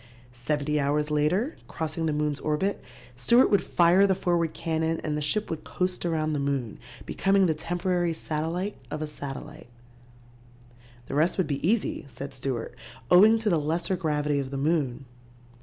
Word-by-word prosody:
Seventy 145 +4 -1
hours 150 +2 0
later, 180 - +1
crossing 160 0 -3
the - - +1
moon's 150 -1 -1
orbit, 155 +7 -1 0.3
Stewart 235 - +4
would 200 - +4
fire 180 +3 +4
the 190 - +2
forward 175 -3 0
cannon 160 0 -1
and 150 -2 -1
the 150 - -2
ship 210 +9 0
would 160 - -4
coast 180 -1 -2
around 155 -2 0
the 145 - -1
moon, 140 -5 -2 0.3
becoming 195 0 +2
the 165 - +2
temporary 175 +2 -1
satellite 165 +5 -3
of 150 0 -4
a - - -1
satellite. 150 0 -8 1.4
"The - - -7
rest 155 +5 +2
would 185 - +2
be 140 0 -3
easy," 220 -9 0
said 140 +1 -8
Stewart, 130 -3 -4 0.4
"owing 210 +5 +7
to 220 -1 0
the 165 - +3
lesser 165 +5 0
gravity 150 -4 0
of 135 -1 -3
the 135 - -4
moon. 140 -3 0
155 Hz, 165 wpm, -27 LUFS, 145-180 Hz, 1.4 s, owing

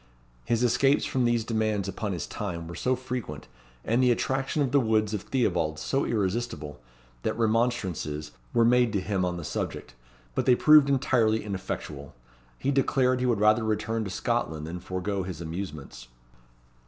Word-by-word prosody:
His 115 +1 +1
escapes 125 +4 +3
from 130 -2 0
these 120 -1 +2
demands 110 -3 -1
upon 100 +2 -3
his 85 -4 -3
time 85 -5 -5
were 85 - -7
so 125 +10 0
frequent, 120 - -6 0.4
and 115 +3 +2
the 125 - +4
attraction 135 +3 0
of 130 - -1
the 140 - +5
woods 110 -3 +1
of 105 - -2
Theobalds 85 - 0
so 135 - 0
irresistible, 100 -8 -2 0.4
that - - -2
remonstrances 110 -10 0 0.2
were 115 - +3
made 120 -1 +4
to 100 - +1
him 95 0 -1
on 90 -1 -1
the 85 - -6
subject; 75 - -4 0.4
but - - -1
they 125 - +7
proved 150 +1 +6
entirely 120 -5 +2
ineffectual. 80 -9 -6 0.4
He 140 - 0
declared 130 -2 +2
he 125 - 0
would 120 -4 +1
rather 110 +2 +4
return 110 +1 -1
to 100 - -4
Scotland 80 -4 -2
than 85 +3 -5
forego 95 +2 -3
his 90 -3 -6
amusements. 80 -8 -7
110 Hz, 165 wpm, -27 LUFS, 90-125 Hz, 0.4 s, they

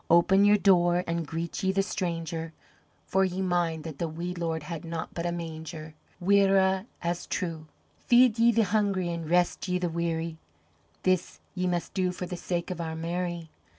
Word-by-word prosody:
Open 185 +3 +5
your 205 0 +6
door 175 -3 +4
an' 170 -1 -2
greet 165 +2 -4
ye 190 - +2
the 195 0 +1
stranger 165 -4 -3 0.5
For 190 0 +2
ye 185 0 -1
mind 175 -4 0
that 155 -3 -7
the 170 - 0
wee 170 +3 -4
Lord 165 -3 -2
had 165 0 -6
naught 165 -1 -4
but 170 0 -2
a - - 0
manger. 160 -2 -6 0.3
Mhuire 195 +1 +3 0.2
as 170 0 -2
truagh! 165 -4 -3 0.4
"Feed 240 -2 +5
ye 235 +1 +6
the 225 0 +3
hungry 200 -4 +1
an' 170 -2 -4
rest 175 +3 +1
ye 180 0 +1
the 180 -1 -1
weary, 165 -1 -2 0.7
This 185 -1 0
ye 185 -1 -1
must 175 -1 -2
do 185 -2 +1
for 180 0 -5
the 180 - -5
sake 175 0 -3
of 175 -2 -4
Our 160 -1 -4
Mary. 170 0 -3
175 Hz, 185 wpm, -28 LUFS, 165-190 Hz, 0.7 s, your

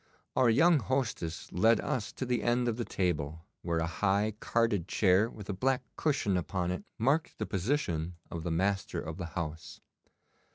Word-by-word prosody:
Our 125 -2 +5
young 160 +7 +5
hostess 110 -9 -2
led 110 +5 +4
us 120 - -2
to 130 - -4
the 125 -1 0
end 120 +1 +2
of 115 -1 0
the 120 - -2
table, 80 -3 -2 0.2
where 85 -1 -1
a 80 - +1
high 100 +5 +1
carded 115 -7 +1
chair 100 +3 +3
with 105 -4 -10
a 100 - -2
black 130 +6 +1
cushion 130 -11 +1
upon 90 0 -1
it 90 - -3
marked 145 +8 +1
the - - -2
position 90 - -1 0.2
of 85 - -4
the 85 - -3
master 95 +4 0
of 80 +1 -5
the 90 -3 -4
house. 80 -1 -5
100 Hz, 175 wpm, -31 LUFS, 85-120 Hz, 0.2 s, Our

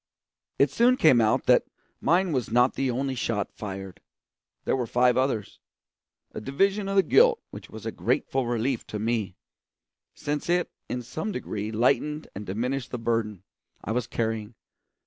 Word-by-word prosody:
It 140 -1 +3
soon 245 +9 +4
came 130 - +5
out 110 -1 +2
that - - +5 0.3
mine 180 +1 +2
was 130 -5 -1
not 125 +3 +4
the 135 - -1
only 135 +2 -1
shot 115 -4 -2
fired; 95 -2 -7 0.6
there - - +2
were 125 -3 -2
five 125 +1 +3
others 130 -6 -1 0.7
a - - -6
division 195 - +1
of 195 - -1
the 195 - +6
guilt 470 - +5
which - - -10
was - - -10
a - - -2
grateful 135 -2 -1
relief 120 +1 -1
to 105 - -4
me, 110 -3 -1 0.8
since 145 +2 -3
it 175 0 +1 0.2
in 125 0 -3
some 160 - -4
degree 110 - -4
lightened 150 +7 +1
and 105 +1 -7
diminished 125 +6 -2
the 125 - -4
burden 115 -4 -1 0.4
I - - -3
was 120 +1 -1
carrying. 110 -1 -3
125 Hz, 165 wpm, -26 LUFS, 110-145 Hz, 0.8 s, the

